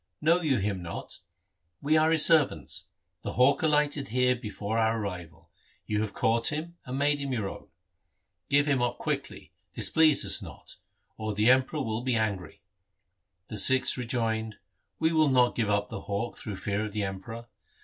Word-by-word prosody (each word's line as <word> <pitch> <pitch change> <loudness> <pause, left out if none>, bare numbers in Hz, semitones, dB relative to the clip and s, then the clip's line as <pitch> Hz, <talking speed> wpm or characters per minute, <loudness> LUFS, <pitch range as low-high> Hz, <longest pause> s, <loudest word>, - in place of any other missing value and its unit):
Know 165 +4 +3
you 145 -6 +1
him 100 -2 -2
not? 85 -1 -7 0.6
We 155 +2 +1
are 155 0 +4
his 160 -2 +6
servants. 145 - +2 0.3
The - - -5
hawk 130 +3 +3
alighted 150 -2 +1
here 125 +2 +2
before 110 -2 -4
our 115 0 +1
arrival. 90 -6 -7 0.3
You 105 0 -1
have 110 -2 -3
caught 115 +1 +1
him, 160 +3 -3
and 130 +1 -4
made 145 +1 +2
him 140 -1 -4
your 110 -5 -2
own. - - -9 0.8
Give 145 +1 +3
him 140 -4 +1
up 120 -1 -1
quickly, - - -5 0.2
displease 160 -2 +3
us - - +1
not, - - -11 0.4
or 110 -1 -4
the 105 +4 +4
Emperor 130 +3 +1
will 110 -1 -3
be 125 -1 -1
angry.' 105 -4 -3 0.8
The 110 - -6
Sikhs 130 +6 +5
rejoined, 115 -3 -2 0.4
'We 160 0 +1
will 155 -2 +3
not 125 -2 +3
give 110 -3 -1
Up 105 0 0
the - - -6
hawk 100 +4 -4
through 105 - -7
fear 100 +2 -3
of 105 -2 -6
the 105 -1 -2
Emperor. 100 +5 -6
120 Hz, 175 wpm, -28 LUFS, 105-145 Hz, 0.8 s, his